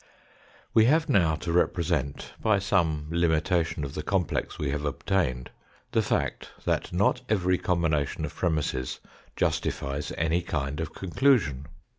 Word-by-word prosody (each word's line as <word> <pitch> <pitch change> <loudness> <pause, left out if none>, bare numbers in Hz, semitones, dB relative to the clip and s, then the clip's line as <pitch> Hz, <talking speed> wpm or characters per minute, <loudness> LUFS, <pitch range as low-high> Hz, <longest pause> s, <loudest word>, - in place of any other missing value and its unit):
We 110 - +6
have 155 +5 +3
now 85 - +4
to 85 - -4
represent, 85 -5 0
by 110 -2 +3
some 85 -6 +1
limitation 85 -1 +1
of 70 -1 -5
the - - -3
complex 90 +1 -1
we 75 -2 -1
have 75 +1 -2
obtained, 75 -4 -1 0.4
the - - +3
fact - - -1 0.2
that - - 0
not - - +2
every 90 -4 +2
com 85 -2 0
bination 75 -3 0
of - - -7
premisses 75 -6 -1 0.4
justifies 70 +2 -1
any 80 +2 +1
kind 75 -3 -3
of 80 - -4
conclusion. 95 - +2
80 Hz, 140 wpm, -27 LUFS, 75-90 Hz, 0.4 s, We